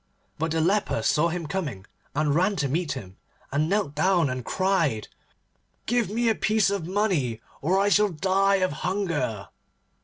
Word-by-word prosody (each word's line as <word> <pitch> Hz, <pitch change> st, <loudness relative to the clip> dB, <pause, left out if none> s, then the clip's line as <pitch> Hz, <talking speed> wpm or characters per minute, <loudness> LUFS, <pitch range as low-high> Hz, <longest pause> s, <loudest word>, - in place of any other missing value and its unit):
But 160 Hz, +2 st, 0 dB
the 160 Hz, 0 st, 0 dB
leper 200 Hz, +5 st, +1 dB
saw 160 Hz, +2 st, +3 dB
him 170 Hz, 0 st, -4 dB
coming, 150 Hz, -, -4 dB, 0.3 s
and 150 Hz, -1 st, +1 dB
ran 185 Hz, +6 st, +2 dB
to 150 Hz, -6 st, 0 dB
meet 155 Hz, +3 st, -1 dB
him, 95 Hz, -1 st, -9 dB, 0.3 s
and 150 Hz, +3 st, +1 dB
knelt 195 Hz, -7 st, 0 dB
down 165 Hz, -2 st, +2 dB
and 130 Hz, -1 st, -4 dB
cried, 165 Hz, -, 0 dB, 0.8 s
'Give 240 Hz, -3 st, +1 dB
me 230 Hz, +3 st, 0 dB
a 225 Hz, -, +4 dB
piece 215 Hz, -2 st, +2 dB
of 195 Hz, -5 st, -2 dB
money 180 Hz, -, 0 dB, 0.2 s
or 180 Hz, +6 st, +2 dB
I 200 Hz, +1 st, +3 dB
shall 205 Hz, +2 st, +4 dB
die 195 Hz, +4 st, +2 dB
of 185 Hz, -1 st, +1 dB
hunger. 165 Hz, -, -2 dB
175 Hz, 165 wpm, -25 LUFS, 150-195 Hz, 0.8 s, a